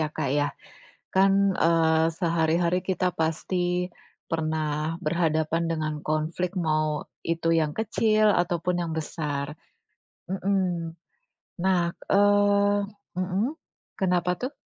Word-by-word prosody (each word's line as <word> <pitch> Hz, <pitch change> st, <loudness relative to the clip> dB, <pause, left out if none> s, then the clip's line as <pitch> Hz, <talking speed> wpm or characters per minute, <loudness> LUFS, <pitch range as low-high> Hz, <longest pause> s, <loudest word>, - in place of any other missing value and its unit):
ya 155 Hz, -, 0 dB
Kak 140 Hz, -, -3 dB
ya. 145 Hz, 0 st, +2 dB, 0.7 s
Kan, 195 Hz, 0 st, +4 dB
eee, 160 Hz, -1 st, +3 dB
sehari-hari 170 Hz, +1 st, +1 dB
kita 185 Hz, -1 st, 0 dB
pasti 180 Hz, +2 st, 0 dB, 0.4 s
pernah 155 Hz, 0 st, -1 dB
berhadapan 165 Hz, -1 st, 0 dB
dengan 155 Hz, -1 st, -2 dB
konflik, 160 Hz, +4 st, -1 dB
mau 155 Hz, -2 st, 0 dB, 0.2 s
itu 165 Hz, 0 st, -1 dB
yang 150 Hz, -1 st, 0 dB
kecil 215 Hz, -1 st, +2 dB
ataupun 175 Hz, 0 st, 0 dB
yang 165 Hz, -2 st, -3 dB
besar. 150 Hz, -2 st, -3 dB, 0.8 s
Mmm. 185 Hz, -4 st, -1 dB, 0.7 s
Nah, 185 Hz, -2 st, +3 dB, 0.3 s
eee 205 Hz, 0 st, +4 dB, 0.4 s
mmm, 185 Hz, +4 st, 0 dB, 0.5 s
kenapa 180 Hz, -2 st, +1 dB
tuh? 255 Hz, +3 st, -2 dB
170 Hz, 100 wpm, -26 LUFS, 160-190 Hz, 0.8 s, Kan